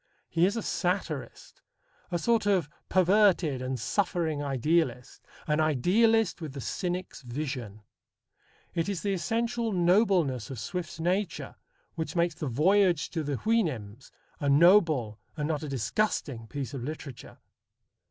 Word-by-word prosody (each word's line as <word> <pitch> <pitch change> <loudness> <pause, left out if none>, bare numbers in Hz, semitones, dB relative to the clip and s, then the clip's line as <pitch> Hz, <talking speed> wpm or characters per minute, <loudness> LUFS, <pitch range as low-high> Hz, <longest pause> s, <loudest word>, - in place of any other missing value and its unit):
He 170 +1 +3
is 205 +4 -2
a 225 - -2
satirist, 175 -6 -3 0.5
a 175 - 0
sort 225 +4 +1
of 190 -7 +2 0.2
perverted 185 -7 +3
and 130 0 -3
suffering 160 - -1
idealist: 140 -1 0 0.2
an 150 0 +1
idealist 190 - +2
with 155 -4 -6
the 140 - -6
cynic's 180 +5 -4
vision. 120 -5 -5 0.9
It 165 +3 -1
is 195 -4 -3
the 200 -1 0
essential 230 +4 -1
nobleness 175 - +2
of 135 - -6
Swift's 170 - -5
nature 180 +2 -1 0.4
which 160 -1 -4
makes 170 0 +2
the 160 -2 -5
voyage 175 - +3
to 165 - -2
the 145 -1 -2
Houyhnhnms 135 - -1 0.3
a 145 - 0
noble 155 - +4 0.2
and 150 -1 -1
not 155 -2 -1
a 155 - -5
disgusting 135 - -1
piece 140 -1 -5
of 130 -4 -5
literature. 145 -2 -8
160 Hz, 135 wpm, -28 LUFS, 135-190 Hz, 0.9 s, noble